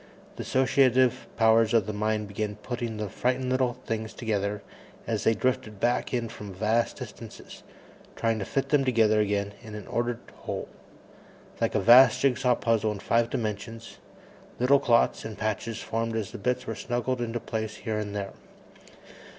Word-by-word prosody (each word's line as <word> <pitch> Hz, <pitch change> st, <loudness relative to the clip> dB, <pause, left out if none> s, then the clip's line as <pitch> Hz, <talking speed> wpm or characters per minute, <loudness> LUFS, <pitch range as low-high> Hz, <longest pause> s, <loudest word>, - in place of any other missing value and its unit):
The -, -, -6 dB
associative 130 Hz, -1 st, +3 dB
powers 110 Hz, 0 st, +4 dB
of 110 Hz, -4 st, +4 dB
the 105 Hz, -, -4 dB
mind 110 Hz, 0 st, -1 dB
began 105 Hz, +1 st, -3 dB
putting 120 Hz, +1 st, -5 dB
the 105 Hz, 0 st, -3 dB
frightened 125 Hz, +4 st, -1 dB
little 130 Hz, -1 st, +2 dB
things 110 Hz, 0 st, -3 dB
together 105 Hz, -3 st, -2 dB, 0.4 s
as -, -, -2 dB
they 115 Hz, -, +4 dB
drifted 110 Hz, -3 st, -1 dB
back 120 Hz, +3 st, 0 dB
in 120 Hz, -2 st, -1 dB
from 105 Hz, -3 st, -9 dB
vast 110 Hz, +4 st, +1 dB
distances, -, -, -10 dB, 0.5 s
trying 115 Hz, -1 st, 0 dB
to 95 Hz, -, -3 dB
fit 135 Hz, -, -2 dB
them 145 Hz, -2 st, +3 dB
together 110 Hz, -4 st, +3 dB
again 100 Hz, -1 st, -1 dB
in 110 Hz, -2 st, -9 dB
an 105 Hz, -3 st, -7 dB
ordered 120 Hz, 0 st, -1 dB, 0.2 s
whole. -, -, -5 dB, 0.9 s
Like 115 Hz, -, +1 dB
a -, -, +4 dB
vast 120 Hz, +6 st, +7 dB
jigsaw 125 Hz, -2 st, +2 dB
puzzle 110 Hz, -2 st, +1 dB
in -, -, -7 dB
five 115 Hz, +3 st, +1 dB
dimensions, 115 Hz, +1 st, -5 dB, 0.6 s
little 135 Hz, +3 st, +4 dB
clots 120 Hz, -2 st, +2 dB
and 110 Hz, -2 st, -7 dB
patches 110 Hz, +1 st, -3 dB
formed 115 Hz, 0 st, -2 dB
as 110 Hz, -2 st, -3 dB
the -, -, -8 dB
bits 125 Hz, +5 st, -1 dB
were 115 Hz, -, -3 dB
snuggled 120 Hz, +2 st, -2 dB
into 120 Hz, 0 st, -2 dB
place 110 Hz, -2 st, -4 dB
here 110 Hz, -1 st, -3 dB
and 105 Hz, -1 st, -4 dB
there. 100 Hz, -1 st, -4 dB
115 Hz, 165 wpm, -27 LUFS, 105-120 Hz, 0.9 s, vast